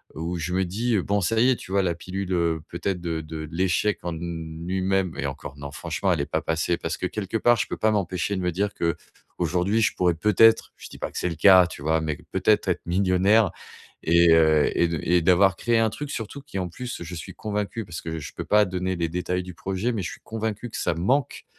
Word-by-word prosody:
où 85 +3 -3
je 85 +2 -3
me 95 +1 +1
dis: 110 +5 0
«Bon, 100 +3 0
ça 110 +5 +1
y 125 +3 +5
est, 130 - +4
tu - - -11
vois 100 0 +3
la 85 -2 0
pilule, 95 +2 -5
heu, 85 -2 +1
peut-être 95 -3 -3
de 85 -2 -2
de 80 0 -7
l'échec 95 +4 +1
en 85 - -3
lui-même» 85 +3 -2
et - - -2
encore 70 0 -7
non 70 0 -7
franchement, - - -2
elle - - -1
est - - -1
pas - - +2
passée 80 +1 0
parce - - -3
que - - -2
quelque 105 +1 -3
part, 120 +2 +4
je - - 0
peux - - -4
pas 110 - +2
m'empêcher 95 -1 -1
de 95 - -2
me 90 0 0
dire 100 +4 -1
qu'aujourd'hui, 90 +4 -2
je 110 - +2
pourrais 90 -1 +2
peut-être 105 +5 +4
je - - -11
dis - - -12
pas - - -4
que - - -9
c'est 90 - 0
le 85 - -4
cas, 95 0 +7
tu 85 - -10
vois? 80 +2 +1
Mais 75 -2 -2
peut-être, - - +2
être - - -1
millionnaire 95 +3 +3 0.5
et 85 0 +5
heu 80 -2 +4
et 85 - +4
de 85 -2 -2
et 90 +1 +3
d'avoir 95 +3 +4
créé 120 +3 +1
un 110 -1 +3
truc 145 +6 -6
surtout 115 +6 -5
qui 140 -8 -6
en 90 - -2
plus, 120 +6 -6
je 85 +1 -7
suis 80 - -8
convaincu 105 +1 -3
parce 85 -3 -7
que 80 -1 -5
je 75 - -8
peux - - -5
pas 105 0 +4
donner 95 0 -2
les 85 -1 0
détails 90 +1 -2
du 90 0 -9
projet, 95 +6 -2
mais 110 - -2
je 85 - -4
suis - - -11
convaincu 110 +1 -4
que - - -6
ça - - 0
manque 120 - 0
90 Hz, 245 wpm, -25 LUFS, 85-105 Hz, 0.5 s, cas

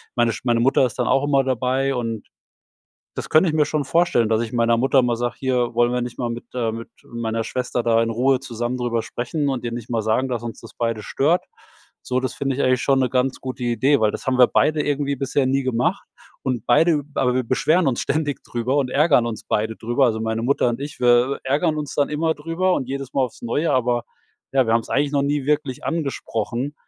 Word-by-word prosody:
meine 120 -1 +2
Sch - - -7
meine 120 -2 +2
Mutter 135 +2 +3
ist - - -11
dann 125 - 0
auch 135 - +2
immer 140 -2 +3
dabei 130 +1 0
und 115 -3 -3 0.9
das - - -5
könnte 160 +3 +5
ich 155 - -1
mir 150 - +4
schon 150 0 -1
vorstellen, 165 -10 +2
dass 110 +1 +1
ich 115 - -5
meiner 115 -1 +2
Mutter 135 +3 +3
mal 120 -1 0
sage: 120 0 -2
„Hier, 125 -3 0
wollen 120 0 +3
wir 125 - 0
nicht 120 0 -6
mal 120 - -1
mit 120 0 -6
äh, 115 -3 0
mit 115 +1 -7
meiner 115 -1 -3
Schwester 125 +1 -2
da 115 -1 +3
in 115 - -1
Ruhe 125 +3 +2
zusammen 120 -1 -4
drüber 120 -2 -1
sprechen 140 +6 -3
und 130 -3 -2
ihr 120 - -3
nicht 120 -1 -6
mal 115 -2 0
sagen, 110 +5 +1
dass 120 -2 -3
uns 115 -1 -7
das - - -13
beide 115 -2 -2
stört?“ 150 - +1 0.6
So, 125 0 -1
das 130 - -3
finde 135 -2 -2
ich - - 0
eigentlich 130 -1 +2
schon 135 -1 +3
'ne 130 - +2
ganz 130 0 0
gute 130 -1 -6
Idee, 130 +4 +2
weil 110 -1 +3
das - - -7
haben 130 -1 +1
wir 125 - +7
beide 150 -1 +2
irgendwie 140 -1 -1
bisher 135 +1 0
nie 135 +1 +1
gemacht. 130 +9 0 0.4
Und 125 -4 -3
beide 160 +5 +4
w - - -9
aber 125 -1 +1
wir 130 - +1
beschweren 155 +8 +2
uns 125 - -1
ständig 145 -2 -2
drüber 120 +3 -2
und 135 -3 +1
ärgern 145 -3 +4
uns 115 -2 -5
beide 110 +1 -1
drüber. 120 +4 +1
Also, 110 -1 0
meine 110 0 -2
Mutter 125 0 +2
und 120 - -2
ich, 145 -2 -7
wir, 125 +2 +4
äh, - - -5
ärgern 155 +3 +1
uns 145 -3 -5
dann 145 0 +1
immer 160 +2 0
drüber 165 +5 0
und 130 - -2
jedes 135 0 -5
Mal 135 - +2
aufs 125 - -4
Neue. 145 +7 0
Aber, 120 -2 +1 0.5
ja, 135 -2 +3
wir 115 - +2
haben's 115 - -1
eigentlich 145 +1 +1
noch 140 - +2
nie 140 -1 -1
wirklich 145 -2 -1
angesprochen. 135 -4 -3
130 Hz, 240 wpm, -22 LUFS, 120-140 Hz, 0.9 s, wir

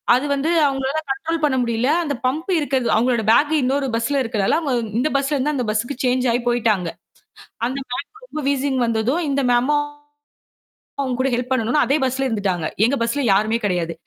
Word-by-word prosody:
அது 260 - 0
வந்து 280 +4 -1 0.2
அவங்களால 270 +2 -1
கன்ட்ரோல் 320 +4 -3
பண்ண 285 -3 +2
முடியல. 235 +3 0 0.2
அந்த 285 - -1
பம்பு 315 +8 -2
இருக்குறது 265 -5 0
அவங்களோட 235 -1 +1
பேக்கு 300 +6 +3
இன்னொரு 270 +2 0
பஸ்ல 270 +5 0
இருக்குறதால 215 -4 0 0.4
இந்த 285 +5 +1
பஸ்ல 275 +1 0
இருந்து 290 +3 0
அந்த 250 -3 -1
பஸ்ஸூக்கு 240 +5 -3
சேஞ்ச் 250 0 +1
ஆயி 245 - 0
போயிட்டாங்க. 220 -7 +1 0.8
அந்த 260 +3 -3
மேம்க்கு 425 - -6
ரொம்ப 310 -10 -5
வீசிங் 275 -1 0
வந்ததும் 230 +9 0
இந்த 280 0 +1
மேமும் 290 +5 +2 1.2
அவங்க 260 -2 -1
கூட 265 +1 +2
ஹெல்ப் 245 +1 -2
பண்ணனும்னு 255 +3 +1
அதே 275 - +2
பஸ்ல 265 +1 0
இருந்துட்டாங்க. 195 -8 -1 0.2
எங்க 245 +5 +3
பஸ்ல 235 +5 0
யாருமே 215 +4 +2
கிடையாது. 175 -4 -1
260 Hz, 170 wpm, -21 LUFS, 230-280 Hz, 1.2 s, பேக்கு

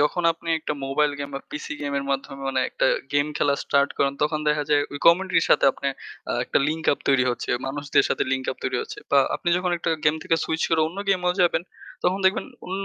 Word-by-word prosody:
যখন 150 +4 +1
আপনি 165 0 -11
একটা 155 - -3
মোবাইল 145 +2 +1
গেম 140 0 -4
বা 135 - -4
PC 150 - -6 0.2
গেমের 140 -1 -2
মাধ্যমে 135 0 -3
মানে 130 -1 0
একটা - - +1 0.3
গেম 145 0 +2
খেলা 140 -1 +2
start 140 0 +2
করেন 140 0 +2
তখন 150 +1 +1
দেখা 150 0 +2
যায় 145 -1 +4
ওই 145 - -5
community 175 0 +5
র - - +1
সাথে - - +5
আপনে 140 - -3 0.4
আ - - 0
একটা - - +1
link 160 0 -3
up - - -3
তৈরি 135 -2 +4
হচ্ছে। 120 - -4 0.2
মানুষদের 140 +1 +1
সাথে - - 0
link 130 0 -1
up - - -16
তৈরি - - 0
হচ্ছে। - - -9
বা 140 - +5 0.2
আপনি 175 - -3
যখন 180 0 -1
একটা 165 - -1
গেম 150 - +4
থেকে 165 - +1
switch 160 0 -1
করে 160 - +3
অন্য 185 +4 -10
গেমেও 180 -2 +2
যাবেন 175 -1 +3 0.4
তখন 185 +2 +2
দেখবেন 190 - +3 0.2
অন্য 195 +2 -3
150 Hz, 230 wpm, -24 LUFS, 140-175 Hz, 0.4 s, community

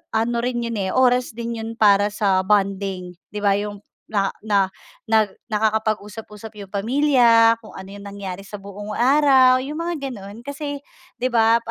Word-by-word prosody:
ano 230 +2 +1
rin 240 0 -2
'yon 230 -2 -3 0.2
oras 250 -2 +2
din 235 -1 -4
'yon 225 +1 -6
para 205 -2 +4
sa 195 -3 0
bonding 195 -3 0 0.2
'di 210 0 -7
'ba 200 0 +3
yung 205 0 -6 0.2
na 200 -2 0
na 200 -3 +2 0.4
na 220 -1 +4 0.2
nakakapag-usap-usap 215 0 -3
yung 200 - -8
pamilya 230 +1 +4
kung 215 - -12
ano 190 0 -10
yung 200 - -10
nangyari 200 -2 -7
sa 205 +1 -9
buong 200 +1 -8
araw 260 +1 +4
yung 300 +4 -5
mga 330 -6 -3
ganun. 205 +1 -10
Kasi 285 +1 -6 0.3
'di 255 +1 -2
'ba 225 0 +4
220 Hz, 160 wpm, -21 LUFS, 200-245 Hz, 0.4 s, para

